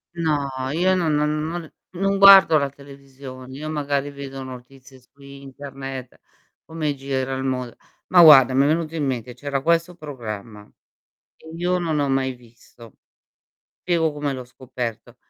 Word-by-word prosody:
No, 155 -4 0 0.2
io 180 +5 +2
n - - +1
non 160 -4 +1
non 150 +1 0
non 170 -2 -7 0.2
non 195 +2 0
guardo 195 -5 +8
la 140 - -1
televisione, 135 -2 -12
io 155 +2 -6
magari 145 -2 -2
vedo 135 -1 -8
notizie 130 +1 -12
su 130 +3 -27
internet, 135 -1 -9 0.5
come 155 -2 -3
gira 135 -1 -3
il 130 - -4
mond 125 -2 -3 0.3
ma 180 - +6
guarda, 135 -6 +8
mi 135 - +4
è - - +2
venuto 160 0 -1
in 150 - -1
mente, 125 -2 -4
c'era 140 +2 -4
questo 170 +1 +1
programma, 115 - -8 0.7
che - - -18
io 180 +2 0
non 165 -3 -1
ho 145 - +1
mai 135 -1 0
visto; 120 -2 -18 0.8
Piego 165 -3 0
come 145 -1 -3
l'ho 130 -1 -6
scoperto: 125 -2 -7
140 Hz, 155 wpm, -22 LUFS, 130-155 Hz, 0.8 s, guardo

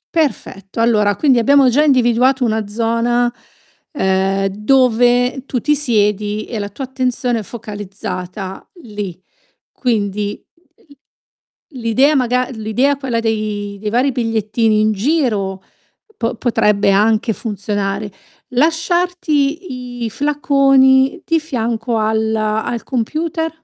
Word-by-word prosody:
Perfetto, 225 - -2
allora 210 -3 +3
quindi 260 -1 +3
abbiamo 275 +1 +5
già 290 +5 +3
individuato 255 -1 +3
una 220 -2 -1
zona, 235 +2 0 0.6
ehm, 195 -4 0
dove 245 +3 +2
tu 250 - -1
ti 300 +3 +1
siedi 210 -5 0
e 225 -3 -5
la 205 0 -4
tua 270 +7 -7
attenzione 250 -2 -1
è - - -4
focalizzata 195 -3 -7 0.2
lì. 205 -5 -6 0.5
Quindi 210 -4 -2 0.3
l 285 -3 -22 0.8
l'idea 255 +6 +3
maga 250 0 +1
l'idea, 245 +5 0
quella 245 -4 -2
dei 210 -2 -2
dei 210 0 -3
vari 255 +5 +2
bigliettini 225 -2 0
in 215 0 +2
giro, 210 - -1 0.5
po 235 +1 -2
potrebbe 210 -4 +2
anche 220 +3 +2
funzionare. 205 -1 -3 0.4
Lasciarti 315 -4 -1
i - - -2
flaconi 275 - +3
di 330 -1 +2
fianco 235 -5 -2
al 220 0 0
al 220 +2 -2
computer? 315 +6 -2
230 Hz, 110 wpm, -17 LUFS, 210-265 Hz, 0.8 s, abbiamo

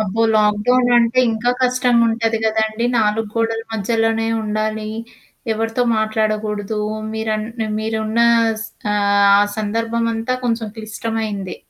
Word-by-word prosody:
అబ్బో! 215 +2 -1
లాక్‌డౌన్ 215 +4 +3
అంటే 235 +1 +2
ఇంకా 225 +2 0
కష్టంగుంటది 235 -3 +2
కదండీ, 220 +1 0
నాలుగు 215 0 +1
గోడల 225 0 -1
మధ్యలోనే 225 +1 0 0.2
ఉండాలి. 215 0 -2 0.6
ఎవరితో 225 +2 -1
మాట్లాడకూడదు. 215 -1 -1 0.4
మీరం 220 -1 -2 0.4
మీరున్న 220 +1 -1 0.4
స్ - - -6 0.3
ఆహ్, 200 0 +3
ఆ 205 - +5 0.2
సందర్భమంతా 230 +2 -1
కొంచెం 230 -2 -1
క్లిష్టమైంది. 215 -3 -4
220 Hz, 105 wpm, -19 LUFS, 215-230 Hz, 0.6 s, ఆ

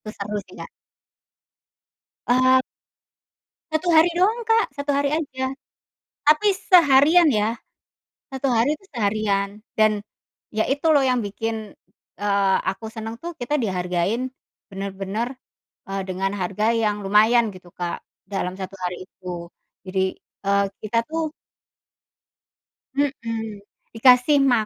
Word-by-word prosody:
Itu 215 - -11
seru 205 +1 -5
sih, - - -15
Kak. - - -7 1.6
Eee 255 +1 +5 1.1
1 315 +3 -1
hari 320 +2 +6
dong 415 +6 +3
Kak, 450 0 +5
1 285 +1 -2
hari 285 +1 +1
aja, 265 -4 -2 0.8
tapi 395 +7 +5
seharian 340 -4 +5
ya, 215 +1 +1 0.8
1 265 +1 -1
hari 245 +5 +3
itu 310 - -11
seharian 205 -4 -1 0.2
dan 215 -1 +3 0.5
ya 220 0 0
itu 280 +3 -2
loh 275 -2 +4
yang 250 -2 +2
bikin, 220 +1 -4 0.4
eee, 200 -1 +2
aku 195 +4 -6
seneng 225 0 -6
tuh, 340 -1 -7
kita 245 +4 -4
dihargain 190 +5 -1 0.4
bener-bener, 195 +3 -4 0.6
eee, 195 0 -3
dengan 190 +1 -1
harga 195 +4 -1
yang 215 -2 +1
lumayan 220 +4 +5
gitu 180 -1 -14
Kak, 175 -1 -3 0.2
dalam 190 -2 -3
1 195 0 -6
hari 180 0 -2
itu 185 -1 -16 0.6
jadi, 190 0 -1 0.4
eee, 200 0 +3 0.2
kita 215 +2 -2
tuh 320 -1 -1 1.7
mhm, 230 -7 -2 0.3
dikasih 250 +5 +5
ma 240 -5 +3
225 Hz, 120 wpm, -23 LUFS, 200-275 Hz, 1.7 s, hari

